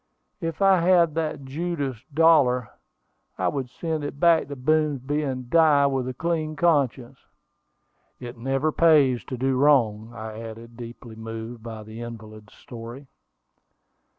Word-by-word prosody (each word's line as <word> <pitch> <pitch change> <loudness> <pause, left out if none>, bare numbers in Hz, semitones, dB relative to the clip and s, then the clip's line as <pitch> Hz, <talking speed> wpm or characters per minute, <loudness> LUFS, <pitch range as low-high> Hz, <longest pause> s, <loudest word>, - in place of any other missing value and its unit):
If 165 +1 -3
I 195 -2 +5
had 170 -2 +4
that 155 -3 -3
Judas 140 -4 -4
dollar, 140 -7 +4 0.7
I - - +1
would 135 -4 -4
send 160 +2 -4
it 145 0 -6
back 170 -1 +4
to 140 - -6
Boomsby, 145 0 0
and 130 -4 -4
die 150 -1 +4
with 135 -2 0
a 130 - -3
clean 160 0 -2
conscience." 140 -7 +1 1.0
"It 120 0 -8
never 135 +5 -1
pays 145 -7 +4
to 130 - -5
do 130 +1 0
wrong," 120 -6 +3
I 110 -1 -7
added, 115 +1 -9
deeply 120 -1 -10
moved 115 +1 -7
by 110 -1 -8
the 110 +2 -9
invalid's 110 -2 -10
story. 120 +3 -10
135 Hz, 140 wpm, -24 LUFS, 115-155 Hz, 1.0 s, I